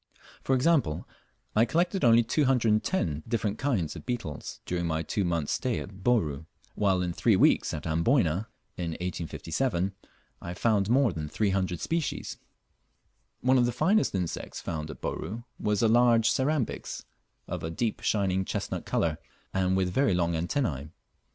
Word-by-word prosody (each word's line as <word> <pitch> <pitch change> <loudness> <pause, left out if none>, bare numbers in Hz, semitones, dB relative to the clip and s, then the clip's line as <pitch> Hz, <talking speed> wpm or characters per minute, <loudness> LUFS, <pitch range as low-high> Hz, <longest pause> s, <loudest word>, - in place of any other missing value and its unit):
For 135 - +2
example, 130 - +2 0.5
I 110 - +6
collected 175 +5 0
only 120 -1 +6
210 115 - +1
different 110 -3 -1
kinds 115 - 0
of - - -8
beetles 120 - -5
during 85 -1 -1
my 80 0 -1
two 100 +5 -1
months' 85 -4 -1
stay 125 -3 -1
at 95 -1 -9
Bourn, 80 - +1 0.3
while 95 -3 +2
in 90 -1 -2
three - - +3
weeks - - +4
at 75 - -5
Amboyna, 85 - +2 0.3
in 85 -2 -2
1857, 90 - -2 0.5
I 85 +1 -6
found 105 -1 +2
more 125 -4 +4
than 75 -2 -5
300 95 -2 0
species: 165 -1 -2 1.0
One 130 +1 +4
of 120 - +4
the - - 0
finest 175 - +2
insects 90 -3 -3
found 80 -2 -4
at 75 - -9
Bouru 110 +8 -4 0.2
was 105 0 +1
a - - +5
large 115 0 +5
Cerambyx, 135 -2 -1 0.4
of - - -4
a 80 - -2
deep 110 +7 -2
shining 95 -3 +1
chestnut - - -4
colour, 80 -1 0 0.3
and 95 0 +2
with 90 -1 0
very 135 -7 +3
long 85 -1 +1
antennae. 80 - -1
100 Hz, 150 wpm, -28 LUFS, 85-120 Hz, 1.0 s, I